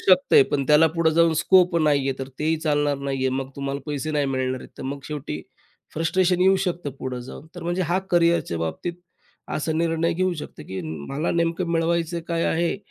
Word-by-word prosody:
शकतंय 190 Hz, -, +5 dB
पण 140 Hz, -2 st, 0 dB
त्याला 150 Hz, +2 st, +6 dB
पुढं 165 Hz, -1 st, +3 dB
जाऊन 165 Hz, -1 st, +4 dB
स्कोप 180 Hz, -2 st, +4 dB
नाही 150 Hz, -3 st, +3 dB
आहे 135 Hz, -, -2 dB
तर 135 Hz, 0 st, -5 dB
तेही 160 Hz, +1 st, +1 dB
चालणार 145 Hz, -2 st, +1 dB
नाही 140 Hz, -1 st, -3 dB
आहे. 130 Hz, 0 st, +1 dB
मग 135 Hz, 0 st, -3 dB
तुम्हाला 140 Hz, 0 st, -3 dB
पैसे 150 Hz, +1 st, -3 dB
नाही 145 Hz, -1 st, +1 dB
मिळणार 130 Hz, 0 st, -1 dB
आहेत -, -, -12 dB
तर -, -, -6 dB
मग 140 Hz, +1 st, -3 dB
शेवटी 145 Hz, -, -5 dB, 0.5 s
फ्रस्ट्रेशन 180 Hz, +3 st, +1 dB
येऊ 190 Hz, +1 st, +5 dB
शकतं 170 Hz, -4 st, -2 dB
पुढं 125 Hz, -1 st, -4 dB
जाऊन. 135 Hz, +4 st, -10 dB
तर -, -, -8 dB
म्हणजे 175 Hz, +2 st, 0 dB
हा 185 Hz, -, +3 dB
करियर 170 Hz, -1 st, +4 dB
च्या 85 Hz, -, -5 dB
बाबतीत 80 Hz, -, -3 dB, 0.6 s
असा 160 Hz, +1 st, -1 dB
निर्णय 165 Hz, +1 st, +1 dB
घेऊ 185 Hz, +2 st, 0 dB
शकतो -, -, -12 dB
की 95 Hz, 0 st, -4 dB
म 80 Hz, -1 st, -5 dB, 0.2 s
मला 150 Hz, +4 st, -1 dB
नेमकं 170 Hz, +1 st, -1 dB
मिळवायचं 170 Hz, 0 st, 0 dB
काय 165 Hz, 0 st, 0 dB
आहे 170 Hz, +2 st, 0 dB
160 Hz, 205 wpm, -24 LUFS, 140-170 Hz, 0.6 s, त्याला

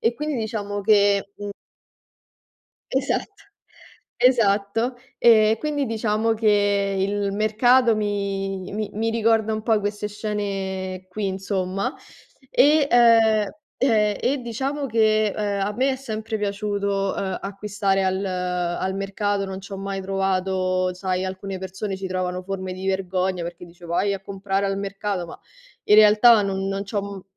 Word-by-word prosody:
e 230 Hz, -, +2 dB
quindi 300 Hz, +2 st, -3 dB
diciamo 210 Hz, -3 st, -3 dB
che, 200 Hz, -1 st, +3 dB
mhmm 205 Hz, 0 st, -6 dB, 1.4 s
Esatto. 280 Hz, +9 st, -2 dB, 0.7 s
Esatto. 225 Hz, -1 st, +2 dB, 0.2 s
Ehm, 220 Hz, -1 st, +5 dB
quindi 290 Hz, -1 st, -1 dB
diciamo 225 Hz, 0 st, 0 dB
che 205 Hz, -2 st, +2 dB
il 200 Hz, +1 st, 0 dB
mercato 225 Hz, +3 st, +3 dB
mi 195 Hz, -2 st, -2 dB
mi 210 Hz, +1 st, -3 dB
mi 225 Hz, +2 st, -1 dB
ricorda 225 Hz, -1 st, +2 dB
un 215 Hz, 0 st, -3 dB
po' 220 Hz, -2 st, +2 dB
queste 205 Hz, +1 st, -3 dB
scene 195 Hz, -3 st, -4 dB
qui, 200 Hz, +2 st, -3 dB
insomma, 195 Hz, +4 st, -2 dB, 0.6 s
e, 295 Hz, +1 st, +5 dB
ehm 225 Hz, -3 st, +5 dB, 0.3 s
ehm, 215 Hz, -5 st, +2 dB
e 275 Hz, +2 st, +1 dB
diciamo 270 Hz, +5 st, -3 dB
che, 215 Hz, -2 st, +3 dB
ehm, 205 Hz, -2 st, -1 dB
a 210 Hz, -, -2 dB
me 265 Hz, +3 st, +2 dB
è -, -, -3 dB
sempre 220 Hz, -4 st, -4 dB
piaciuto, 200 Hz, -1 st, -1 dB
uhm, 190 Hz, -1 st, -2 dB
acquistare 195 Hz, -1 st, -1 dB
al 190 Hz, +1 st, 0 dB
al 180 Hz, 0 st, -2 dB
mercato, 195 Hz, +1 st, -1 dB
non 190 Hz, 0 st, -5 dB
c'ho 195 Hz, 0 st, -8 dB
mai 195 Hz, 0 st, -4 dB
trovato 185 Hz, -1 st, 0 dB
sai, 185 Hz, 0 st, -2 dB
alcune 190 Hz, 0 st, -5 dB
persone 190 Hz, +1 st, -5 dB
ci 190 Hz, 0 st, -5 dB
trovano 185 Hz, 0 st, -2 dB
forme 190 Hz, -1 st, -4 dB
di 185 Hz, +1 st, -6 dB
vergogna, 185 Hz, -1 st, -1 dB
perché 170 Hz, +1 st, -7 dB
dice: 175 Hz, +1 st, -16 dB
"Vai 200 Hz, +4 st, 0 dB
a 195 Hz, -, -6 dB
comprare 195 Hz, 0 st, -2 dB
al 195 Hz, 0 st, -1 dB
mercato!" 195 Hz, -2 st, -3 dB
Ma -, -, -10 dB, 0.5 s
in -, -, +5 dB
realtà 215 Hz, +2 st, +7 dB
non 195 Hz, -1 st, -2 dB
non 195 Hz, +1 st, -3 dB
c'ho, 200 Hz, 0 st, -2 dB
m 200 Hz, -2 st, -7 dB
200 Hz, 145 wpm, -23 LUFS, 190-220 Hz, 1.4 s, realtà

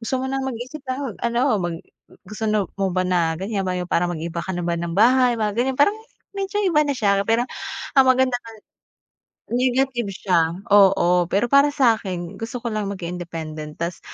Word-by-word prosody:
gusto 255 Hz, +3 st, -2 dB
mo 265 Hz, -, -2 dB
ng 270 Hz, 0 st, -2 dB
mag-isip, 265 Hz, +3 st, -6 dB
ah, 260 Hz, -, -5 dB
mag -, -, -16 dB
ano, 235 Hz, +1 st, +1 dB, 0.2 s
mag 175 Hz, -2 st, -2 dB, 0.5 s
gusto 215 Hz, +1 st, -5 dB
no 210 Hz, -3 st, +1 dB
mo 195 Hz, -2 st, -1 dB
ba 185 Hz, -, +1 dB
na 170 Hz, -3 st, +2 dB
ganyan 195 Hz, -1 st, -2 dB
ba 185 Hz, -, -1 dB
yung 180 Hz, 0 st, -4 dB
parang 175 Hz, 0 st, +1 dB
mag-iiba 170 Hz, +1 st, -4 dB
ka 190 Hz, -, -4 dB
na -, -, -2 dB
ba 170 Hz, -1 st, -1 dB
ng 170 Hz, 0 st, -4 dB
bahay." 250 Hz, +3 st, +5 dB
Mga 210 Hz, -1 st, 0 dB
ganyan. 255 Hz, +2 st, 0 dB
Parang 405 Hz, +8 st, +4 dB, 0.4 s
medyo 395 Hz, +1 st, -2 dB
iba 335 Hz, -6 st, +3 dB
na 285 Hz, -, 0 dB
siya 200 Hz, -3 st, +2 dB
pero 230 Hz, +2 st, +3 dB, 0.5 s
ang 270 Hz, -, +7 dB
maganda 260 Hz, -1 st, +3 dB
ka 230 Hz, -, -12 dB, 1.0 s
Negative 250 Hz, -1 st, +1 dB
siya, 170 Hz, -4 st, +1 dB, 0.2 s
oo 180 Hz, -3 st, +5 dB
pero 200 Hz, +6 st, +1 dB
para 280 Hz, +1 st, +6 dB
sa'kin 195 Hz, -, 0 dB
gusto 230 Hz, +2 st, -5 dB
ko 235 Hz, -, -2 dB
lang 210 Hz, -2 st, -2 dB
maging 180 Hz, -2 st, -5 dB
independent 155 Hz, -3 st, -7 dB
ta's 170 Hz, +1 st, -3 dB
205 Hz, 195 wpm, -22 LUFS, 175-255 Hz, 1.0 s, ang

